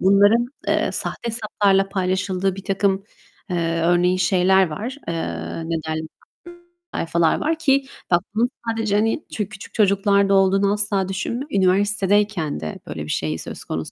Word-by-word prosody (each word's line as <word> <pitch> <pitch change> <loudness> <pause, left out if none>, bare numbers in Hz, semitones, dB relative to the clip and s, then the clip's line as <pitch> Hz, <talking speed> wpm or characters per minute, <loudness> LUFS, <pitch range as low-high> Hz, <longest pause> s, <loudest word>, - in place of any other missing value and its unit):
bunların, 205 +5 +5 0.2
eee, - - +1
sahte 235 - -3
hesaplarla 205 -4 +1
paylaşıldığı 190 0 -1
birtakım, 195 0 0 0.5
eee, 165 -1 0
örneğin 175 +1 +3
şeyler 185 +1 +3
var, 230 - -5
eee, 170 - -1 0.5
neden 160 -1 -3 0.9
sayfalar 165 -1 +1
var, 320 +1 -1
ki 275 -3 +2 0.3
bak 175 0 +4
bunun 240 +3 +2 0.2
sadece, 225 -2 0
hani, 225 +7 +1
çü 210 -2 -3
küçük 220 -3 -11
çocuklarda 200 -1 +3
olduğunu 195 +1 +3
asla 200 -2 0
düşünme. 235 +8 -3
Üniversitedeyken 200 - +1
de 80 0 -6
böyle 75 - -5
bir 75 - -10
şey 80 +1 -1
söz - - -7
konusu 80 0 -4
195 Hz, 140 wpm, -22 LUFS, 180-210 Hz, 0.9 s, bunların